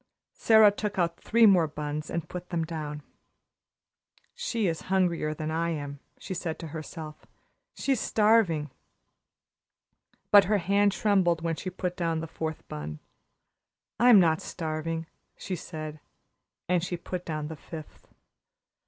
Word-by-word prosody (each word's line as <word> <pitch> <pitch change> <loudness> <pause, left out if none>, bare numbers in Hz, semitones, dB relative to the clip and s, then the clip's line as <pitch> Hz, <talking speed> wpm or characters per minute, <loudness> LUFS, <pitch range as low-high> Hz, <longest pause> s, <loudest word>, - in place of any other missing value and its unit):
Sara 220 -2 +6
took 205 0 -4
out 170 -2 0
three 230 +1 +4
more 185 -6 +6
buns 150 0 -5
and 170 -2 -3
put 180 0 -7
them 165 -2 -1
down. 150 -2 -5 1.3
"She 255 - -2
is 165 -3 -1
hungrier 175 -5 +1
than 155 +1 -4
I 165 +1 0
am," 145 -3 -4 0.2
she - - -6
said 165 -2 -3
to 165 - -7
herself. 155 0 -8 0.5
"She's 270 -4 0
starving." 210 - +3 1.6
But 205 -1 +8
her 210 +3 +2
hand 200 +2 +3
trembled 185 -6 +2
when 165 -1 0
she 185 - -5
put 180 0 -3
down 165 -2 -1
the 165 - -4
fourth 160 0 -5
bun. 75 0 -6 1.0
"I'm 240 -3 +8
not 160 -3 +3
starving," 160 0 -3 0.3
she 190 - -4
said 155 -2 -7 0.7
and 180 -1 +2
she 180 -1 -3
put 180 +1 -5
down 155 -3 -4
the 160 - -6
fifth. 155 0 -11
170 Hz, 140 wpm, -28 LUFS, 155-190 Hz, 1.6 s, But